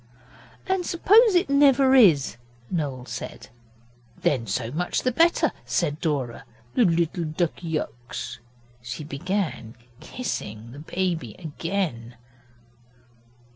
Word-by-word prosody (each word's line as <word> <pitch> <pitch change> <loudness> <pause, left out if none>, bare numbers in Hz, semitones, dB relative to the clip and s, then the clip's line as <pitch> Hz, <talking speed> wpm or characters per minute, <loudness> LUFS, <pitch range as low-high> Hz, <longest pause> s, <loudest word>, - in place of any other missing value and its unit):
'And 375 -1 0
suppose 415 +5 +5
it 350 +2 +3
never 275 -1 +5
is,' 170 - +5 0.3
Noel 140 -7 -2
said. 120 -3 -7 0.7
'Then 120 -5 0
so 115 +4 -2
much 175 +5 -1
the 255 - +2
better,' 335 +7 +3
said 150 -3 -1
Dora, 135 -7 -2 0.3
'the 240 - +4
little 170 0 +1
Duckyux.' 155 -7 -3 0.4
She 120 +5 -6
began 150 - -3 0.2
kissing 115 - -5
the 140 - -10
baby 165 - -2
again. 160 -7 -3
160 Hz, 100 wpm, -25 LUFS, 125-210 Hz, 0.7 s, suppose